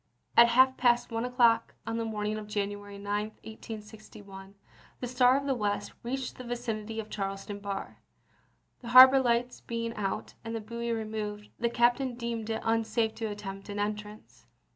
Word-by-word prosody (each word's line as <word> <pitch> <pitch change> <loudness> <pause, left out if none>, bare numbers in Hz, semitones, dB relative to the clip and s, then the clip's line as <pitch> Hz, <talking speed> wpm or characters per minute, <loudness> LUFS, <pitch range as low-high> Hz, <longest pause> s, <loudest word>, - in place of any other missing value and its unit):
At 235 - +9
half 260 +2 +5
past 240 -1 +3
one 230 +1 -1
o'clock 235 -2 +3
on 225 +1 -2
the 230 - -1
morning 210 -1 -2
of 210 - -9
Janu 205 -1 -2
ary 205 0 -10
9, 205 +1 -2 0.2
1861, 210 -3 -10 0.4
the - - -3
Star 250 +1 +4
of 280 - -3
the 275 - +1
West 210 -4 -2
reached 255 +2 -4
the 255 - -8
vicin 235 -3 -4
ity 225 +1 -5
of 215 -1 -7
Charleston 195 0 -4
bar. 200 -1 -5 0.8
The 240 - -11
harbor 260 +1 +11
lights 245 -1 0
being 230 0 -4
out, 205 0 -3
and 225 0 -5
the - - -2
buoy 235 +2 -4
removed, 215 -2 -4
the 235 - +1
captain 240 +2 +2
deemed 235 -2 -4
it 220 - -3
un 225 0 +2
safe 220 0 0
to 225 - -4
attempt 195 -1 -7
an 205 - -5
entrance. 210 +1 -5
225 Hz, 180 wpm, -29 LUFS, 210-240 Hz, 0.8 s, harbor